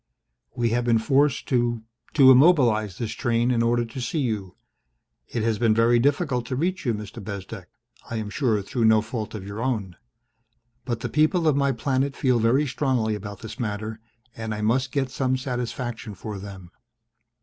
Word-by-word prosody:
"We 120 -1 +1
have 120 +1 +1
been 120 -1 +3
forced 140 +5 +2
to 120 -3 +1 0.3
to 135 -3 +8
immobilize 125 - +4
this 115 -2 -3
train 120 +1 0
in 120 -2 +2
order 120 0 +2
to 115 +3 -7
see 125 - -3
you. 105 -7 -3 0.7
It 115 - -3
has 110 -2 0
been 115 -2 +3
very 115 +1 +4
difficult 135 -2 +1
to 130 - -2
reach 175 +2 -1
you, 115 - +2
Mr. 105 +1 -8
Bezdek, 100 -1 -7 0.4
I 115 - -4
am 110 -2 -4
sure 110 -6 0
through 115 +3 -1
no 110 -1 +5
fault 110 -1 -5
of 100 -3 -7
your 100 +2 -6
own. 110 -8 -2 0.9
But 120 -3 -3
the 125 - -2
people 155 - +2
of 150 - +4
my 140 -1 +2
planet 135 +3 -1
feel 125 -3 +2
very 120 +6 +3
strongly 130 -4 0
about 100 -1 -7
this 115 +3 -8
matter 110 -1 -4 0.4
and 110 -1 -4
I 105 - -5
must 125 +4 +1
get 135 -2 -1
some 130 0 0
satisfaction 120 -4 -4
for 105 +1 -6
them." 95 -3 -10
115 Hz, 185 wpm, -24 LUFS, 110-130 Hz, 0.9 s, to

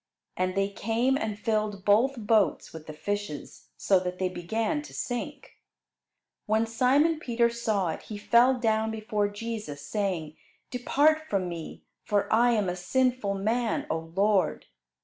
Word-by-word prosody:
And 185 0 -1
they 195 0 +1
came 230 +6 0
and 220 -6 -2
filled 210 -2 -1
both 235 +7 +4
boats 215 -2 +2
with 160 -1 -10
the 155 - -6
fishes, 205 -1 -5
so 190 -2 +3
that 180 0 -4
they 185 0 0
began 220 - -2
to 300 - -12
sink. 275 +3 -5 0.9
When 220 +2 +2
Simon 270 +8 +2
Peter 235 -4 +1
saw 215 -6 0
it 160 - -4
he 210 - -8
fell 240 +5 +4
down 220 -1 +1
before 215 -1 -1
Jesus, 205 -9 -6
saying, 165 -2 -2 0.3
"Depart 310 +5 +2
from 190 -3 0
me, 170 -2 -7 0.2
for 205 -1 0
I 240 +2 +5
am 210 -4 +1
a 180 - -1
sinful 245 +2 0
man, 225 +4 0
O 165 0 -4
Lord." 195 -3 +2
215 Hz, 150 wpm, -27 LUFS, 190-235 Hz, 0.9 s, I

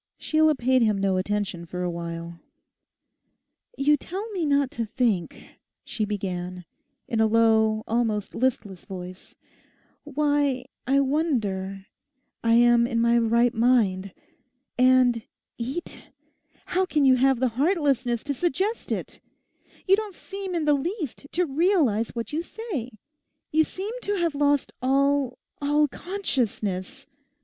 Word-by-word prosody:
Sheila 310 -1 +3
paid 260 0 +2
him 215 -3 +3
no 195 -1 +1
attention 195 -2 -2
for 180 +1 -4
a 175 - -1
while. 170 0 -6 1.4
'You 295 +2 +3
tell 385 +9 -6
me 355 -6 -1
not 280 -2 +2
to 235 -6 -3
think,' 220 -6 -1 0.4
she 215 - -2
began, 180 -3 -4 0.4
in 225 - -1
a 220 - +5
low, 220 -1 +3
almost 220 -3 -1
listless 220 -7 -2
voice; 185 -2 -9 0.7
'why—I 280 -2 0
wonder 210 - -1 0.6
I 230 0 +3
am 240 0 +5
in 235 -2 -1
my 235 0 +3
right 235 +1 +3
mind. 220 -6 +2 0.6
And 255 -2 +4 0.4
"eat"! 265 +9 -5 0.7
How 370 +1 +3
can 295 -4 +2
you 260 -1 +6
have 265 -1 +3
the 255 0 +2
heartlessness 270 - +1
to 285 - -2
suggest 370 - -1
it? - - -4 0.7
You 385 - +7
don't 415 -2 -5
seem 390 -1 -6
in 325 -3 0
the 295 - +4
least 300 - -3
to 360 +1 +2
realize 285 - +2
what 230 +4 -5
you 315 - 0
say. 345 - -5 0.6
You 315 +1 +4
seem 390 +7 -5
to 410 -2 -1
have 340 -4 0
lost 290 -1 +1
all—all 280 +2 +1
consciousness. 255 - -3
255 Hz, 130 wpm, -25 LUFS, 215-300 Hz, 1.4 s, You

